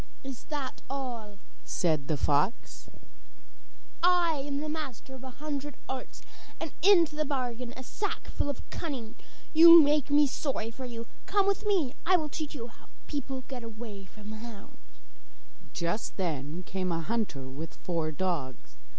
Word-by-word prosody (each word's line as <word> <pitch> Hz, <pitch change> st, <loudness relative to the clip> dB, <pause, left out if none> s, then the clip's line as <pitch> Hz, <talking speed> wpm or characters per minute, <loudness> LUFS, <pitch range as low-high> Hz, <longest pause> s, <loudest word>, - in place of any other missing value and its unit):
'Is 270 Hz, -3 st, -7 dB
that 285 Hz, -4 st, -4 dB
all?' 240 Hz, -7 st, -4 dB, 0.3 s
said 155 Hz, -5 st, +1 dB
the 155 Hz, -, +1 dB
fox. 150 Hz, -, +1 dB, 1.1 s
'I 350 Hz, -1 st, +5 dB
am 290 Hz, +2 st, -2 dB
master 275 Hz, -5 st, -5 dB
of 265 Hz, 0 st, -10 dB
a 260 Hz, -, -6 dB
hundred 290 Hz, 0 st, -4 dB
arts, 260 Hz, -1 st, -6 dB, 0.4 s
and 325 Hz, -3 st, -3 dB
have -, -, -29 dB, 0.2 s
into 330 Hz, -4 st, +3 dB
the 305 Hz, -, +1 dB
bargain 250 Hz, -4 st, -2 dB
a 260 Hz, -, -6 dB
sackful 400 Hz, -, -2 dB
of 280 Hz, -, -5 dB
cunning. 260 Hz, -9 st, -4 dB, 0.4 s
You 335 Hz, +1 st, +11 dB
make 290 Hz, -1 st, +3 dB
me 290 Hz, +1 st, +6 dB
sorry 260 Hz, -5 st, -2 dB
for 260 Hz, +2 st, -7 dB
you; 235 Hz, -2 st, -6 dB, 0.2 s
come 400 Hz, 0 st, +3 dB
with 400 Hz, +1 st, +1 dB
me, 340 Hz, -11 st, +3 dB
I 370 Hz, +2 st, +5 dB
will 310 Hz, -3 st, -2 dB
teach 305 Hz, 0 st, -4 dB
you 235 Hz, -5 st, -4 dB
how 235 Hz, -, -15 dB, 0.2 s
people 270 Hz, -3 st, -3 dB
get 255 Hz, -3 st, -6 dB
away 220 Hz, -3 st, -7 dB
from 210 Hz, +2 st, -11 dB
the 220 Hz, -, -6 dB
hounds.' 225 Hz, -3 st, -10 dB, 0.9 s
Just 170 Hz, +5 st, -2 dB
then 160 Hz, -2 st, -2 dB
came 185 Hz, 0 st, -2 dB
a 165 Hz, 0 st, 0 dB
hunter 195 Hz, -, -2 dB
with 145 Hz, +5 st, -7 dB
four 165 Hz, -3 st, -1 dB
dogs. 150 Hz, -6 st, -3 dB
250 Hz, 160 wpm, -30 LUFS, 195-295 Hz, 1.1 s, You